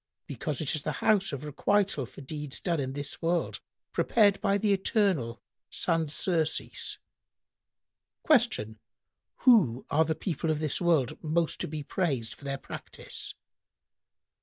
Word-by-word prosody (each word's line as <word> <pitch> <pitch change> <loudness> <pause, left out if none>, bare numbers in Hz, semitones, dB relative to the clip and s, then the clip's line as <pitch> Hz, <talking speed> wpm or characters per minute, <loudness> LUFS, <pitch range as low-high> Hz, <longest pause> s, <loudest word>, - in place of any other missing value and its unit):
"— - - -63
"Because 150 -1 -4
it 150 - 0
is 155 - -1
the - - -2
house 195 -3 +2
of 140 -1 -5
requital 150 - +1
for - - -12
deeds 145 0 -4
done 170 -4 -1
in 135 -1 -2
this 145 0 -4
world 170 +1 0 0.3
prepared 205 -4 +3
by 200 0 +2
the 205 0 +2
Eternal 190 - +1 0.3
sans 165 -3 +1
surcease." 160 -4 0 1.3
Q 230 - +3 0.6
"Who 185 - +5
are 155 +2 +4
the 160 - -1
people 165 -3 -2
of 155 - +2
this 155 +2 -1
world 155 -5 +1
most 165 +1 0
to - - -2
be 150 -1 -5
praised 140 -9 -1
for 140 - -15
their 135 0 -2
practice?" - - -6
160 Hz, 145 wpm, -29 LUFS, 140-190 Hz, 1.3 s, Who